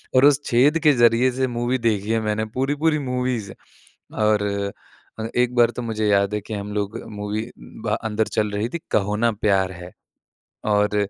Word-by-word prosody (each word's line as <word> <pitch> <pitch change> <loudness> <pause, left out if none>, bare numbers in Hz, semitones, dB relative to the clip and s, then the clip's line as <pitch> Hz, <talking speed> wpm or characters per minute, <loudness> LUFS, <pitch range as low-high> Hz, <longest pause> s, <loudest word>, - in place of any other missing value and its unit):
और 130 +2 +6
उस 145 -1 +5
छेद 140 +7 +3
के 150 -2 +6
ज़रिए 120 +1 +4
से 130 +1 0
मूवी 120 +1 -1
देखी 110 -3 0
है 115 - +2
मैंने, 110 0 -1
पूरी-पूरी 145 +7 0
मूवीज़। 125 -6 -2 0.6
और 105 -1 +2 0.8
अ, 110 - -2
एक 125 0 +1
बार 120 -1 +5
तो - - -2
मुझे 110 -2 -2
याद 100 0 +2
है 105 - -1
कि 110 - -8
हम 105 0 -5
लोग 105 +1 -2
मूवी 105 +2 -4 0.4
भा - - 0 0.2
अंदर 110 +1 0
चल 105 -1 -1
रही 105 +3 -2
थी, 170 - -4
कहो 105 0 +1
ना 120 - +4
प्यार 100 -3 +1
है। 90 0 -10 0.7
और 105 0 +2
110 Hz, 185 wpm, -22 LUFS, 105-125 Hz, 0.8 s, और